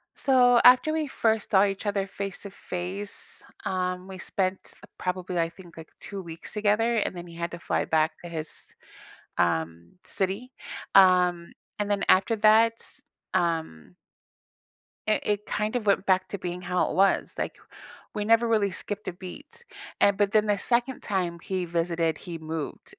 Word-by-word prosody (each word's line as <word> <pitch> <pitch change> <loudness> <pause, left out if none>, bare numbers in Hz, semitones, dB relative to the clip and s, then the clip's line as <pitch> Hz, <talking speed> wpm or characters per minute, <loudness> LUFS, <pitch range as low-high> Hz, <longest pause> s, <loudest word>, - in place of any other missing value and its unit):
So 250 -3 +5
after 255 +5 +7
we 315 -1 -1
first 225 -5 0
saw 195 0 +6
each 195 +1 -3
other 200 -1 0
face 195 0 -5
to 200 - -8
face, 200 - -6 0.2
um, 185 0 -2
we 190 -1 -8
spent 185 +1 -1 0.4
probably, 180 -1 -3
I 165 0 +1
think, 175 -1 -15
like, 160 -1 -10
2 200 -1 -7
weeks 165 -2 -9
together, 215 +2 +2
and 210 - -1
then 175 0 -7
he 170 - -12
had 170 0 -3
to 170 - -7
fly - - -1
back 160 0 +2
to 175 - -7
his, 160 -2 -7 0.6
um, 85 0 0
city. 200 +7 -3 0.4
Um, 180 -2 +5 0.3
and 205 0 -1
then 200 -1 +1
after 195 +5 +4
that, 220 +2 +5 0.6
um 160 - -1 1.1
it 215 - +2
it 210 0 0
kind 210 +2 -2
of 240 -3 -1
went 200 -1 +2
back 185 -1 +2
to 200 - -4
being 180 -1 -5
how 180 0 0
it - - -4
was, 195 +1 +3
like, - - -3 0.6
we 210 -1 -1
never 230 +2 +4
really 215 -3 +2
skipped 205 +3 -5
a - - -2
beat. 290 - -10 0.4
And 200 -1 +4
but 205 -1 +2
then 215 0 +3
the 205 -1 +2
2nd 245 +5 0
time 180 -4 -1
he 185 +1 -3
visited, 165 -1 0
he 170 -2 -7
moved. 160 -1 -6
190 Hz, 170 wpm, -27 LUFS, 175-210 Hz, 1.1 s, after